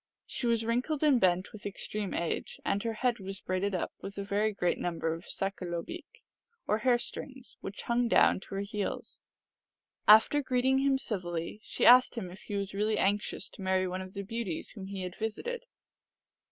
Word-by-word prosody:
She 245 - -3
was 230 -1 +2
wrinkled 255 +7 0
and 280 -5 +5
bent 185 0 +2
with 215 - -10
extreme 205 0 -3
age, 170 -1 -2
and 200 0 +1
her 230 0 -2
head 240 +1 0
was 195 0 -5
braided 185 +2 -1
up 180 - -2
with 200 0 -7
a 200 - -2
very 205 +2 +1
great 180 -4 0
number 165 -2 -1
of 165 +2 -8
sakalobeek, 195 - -4 0.4
or 210 - +1
hair 250 0 +4
strings, 265 +1 -6
which 200 - -6
hung 240 0 +1
down - - +5
to 195 - -9
her 195 - -1
heels. 200 0 -4 0.9
After 220 +7 +7
greeting 260 0 +2
him 270 0 +3
civilly, 180 -7 -3
she - - -1
asked 250 +1 +8
him 185 -7 -4
if 190 - -11
he 205 - -5
was 200 0 -2
really 210 +2 +1
anxious 205 +2 +1
to - - -12
marry 190 0 +1
one 185 +1 -3
of 185 +1 -9
the 200 - -3
beauties 205 -5 -3
whom 195 -4 -8
he 195 -1 -5
had 180 -1 -5
visited. 470 - -3
205 Hz, 190 wpm, -30 LUFS, 190-240 Hz, 0.9 s, asked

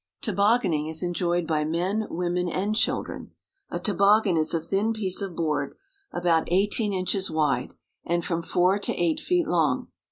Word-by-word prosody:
Tobogganing 200 -6 +2
is 160 +2 -1
enjoyed 175 -1 0
by 155 -2 0
men, 180 +7 -1
women, 180 +1 -1
and 200 +5 -1
children. 225 - -2 0.4
A - - -3
toboggan 205 -1 +3
is 155 -1 +2
a 165 - +1
thin 195 +7 0
piece 200 -3 -1
of 190 -4 -5
board 150 -4 -1 0.4
about 170 -2 +1
eighteen 205 +3 +2
inches 190 0 0
wide 150 -5 0 0.3
and 170 0 -1
from 170 -1 -1
four 180 +4 +2
to - - -2
eight 170 -2 +1
feet 355 -2 +1
long. 155 -7 +1
180 Hz, 160 wpm, -25 LUFS, 165-200 Hz, 0.4 s, toboggan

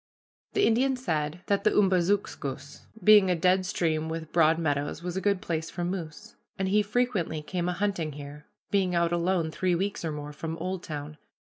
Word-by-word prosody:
The 405 - +3
Indian 260 +4 +3
said 160 - -2
that 200 -1 +1
the - - +5
Umbazookskus, 185 -8 0 0.2
being 210 -3 +7
a 180 - +3
dead 185 +2 +2
stream 160 -3 0
with 160 -1 -5
broad 160 -1 +4
meadows, 145 0 -1
was 180 0 -4
a 190 - -1
good 200 -2 +1
place 160 -1 -2
for 175 - -4
moose, 180 +3 -6 0.2
and 190 -1 -1
he 210 +2 +4
frequently 205 -8 -1
came 175 +2 -2
a - - 0
hunting 180 -5 -1
here, 145 +1 -10 0.2
being 190 -3 +2
out 170 0 +2
alone 175 -1 +1
three 180 +2 0
weeks 195 +2 -2
or 160 - -2
more 150 0 -6
from 160 +2 -5
Oldtown. 155 -5 -5
175 Hz, 180 wpm, -28 LUFS, 155-195 Hz, 0.2 s, being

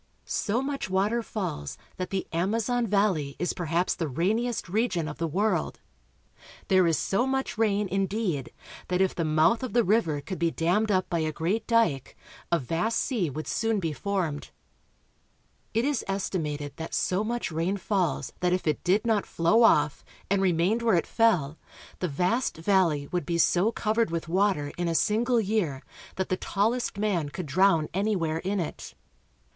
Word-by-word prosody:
So 230 +5 -1
much 275 -7 -3
water 200 +5 +1
falls 185 - -4 0.2
that 185 - -3
the 195 -1 -2
Amazon 225 +7 0
valley 190 -9 +1
is 180 - -1
perhaps 175 +1 0
the 165 - -3
rainiest 215 - -1
region 190 -4 0
of 150 - -7
the 165 - 0
world. 200 +7 0 0.9
There 185 -3 +5
is 165 -3 +2
so 215 - 0
much 265 0 -1
rain, 210 -2 +1
indeed, 190 - -1 0.4
that 180 0 0
if 190 -1 +2
the 170 - -2
mouth 155 +7 +3
of 255 - -4
the 240 0 +4
river 180 -8 +2
could 185 +6 -6
be 170 0 +2
dammed 180 +7 +1
up 185 -2 +2
by 170 - -1
a 155 -1 0
great 180 +8 -2
dike 225 - +1 0.3
a 170 - +4
vast 165 - -1
sea 220 - 0
would 155 +3 -5
soon 225 -1 0
be 165 -4 -2
formed. 170 -3 -2 1.2
It 230 +3 +1
is 285 -4 0
estimated 150 -7 -3
that 160 - -5
so 185 +3 +1
much 235 -3 -2
rain 170 +5 -1
falls 190 -2 -1
that 180 0 +1
if 185 - -1
it 155 -2 0
did 195 +5 +2
not 220 -3 +1
flow 170 +8 +3
off, 150 -10 +4 0.3
and 200 -1 +3
remained 185 +5 +2
where 230 -4 +3
it 170 - +1
fell, 175 -11 +1 0.4
the 180 - -1
vast 180 - 0
valley 165 -4 +2
would 175 -5 -2
be 170 - 0
so 180 +5 +3
covered 225 -1 0
with 165 0 -3
water 180 -5 +1
in 175 - 0
a 165 - -1
single 230 +6 +2
year 195 -11 -1 0.3
that 190 - -2
the 185 - 0
tallest 225 +7 -1
302 - - -7
BRAZIL. 200 -6 +1
man - - -6
could 180 +4 -6
drown 165 +1 +3
anywhere 185 -5 0
in 195 +3 -2
it. 170 - -5
185 Hz, 180 wpm, -27 LUFS, 165-215 Hz, 1.2 s, There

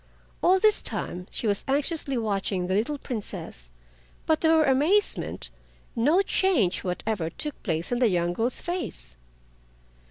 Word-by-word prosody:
All 370 +2 +5
this 425 +2 +3
time 180 +1 -5
she - - -1
was 205 -2 +1
anxiously 280 0 0
watching 200 -4 -1
the 185 - -1
little 230 +9 0
Princess, 200 - -7 0.6
but 315 -1 +2
to 320 - +4
her 320 -1 +5
amazement 305 +10 +1 0.4
no 300 +12 +3
change 335 - +1
whatever 180 -1 -2
took 295 - -3
place 165 -1 -2
in 245 - 0
the 245 -3 +4
young 175 -2 0
girl's 230 +6 0
face. 345 - -4
240 Hz, 145 wpm, -26 LUFS, -, 0.6 s, All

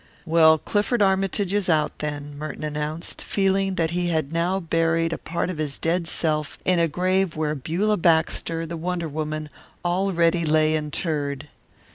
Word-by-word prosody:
"Well, 160 -1 +6
Clifford 210 - +1
Armytage 195 0 +1
is 205 -3 +1
out, 155 -2 +1
then," 145 -1 -4
Merton 150 +1 -6
announced, 150 +2 -4
feeling 195 -1 +1
that 165 -2 0
he 175 0 0
had 160 -3 -1
now 175 +3 +1
buried 165 -1 +1
a - - -2
part 170 +1 -2
of 165 - -7
his 145 -3 -1
dead 170 +1 0
self 155 -2 -1
in 180 -2 +3
a 165 - +3
grave 185 +2 0
where 155 -1 -1
Beulah 175 +9 0
Baxter, 165 0 +1
the 165 +1 -5
wonder 170 0 -2
woman, 155 0 -4 0.4
already 175 -2 +2
lay 155 0 +3
interred. 150 -2 -3
165 Hz, 160 wpm, -24 LUFS, 155-180 Hz, 0.4 s, Well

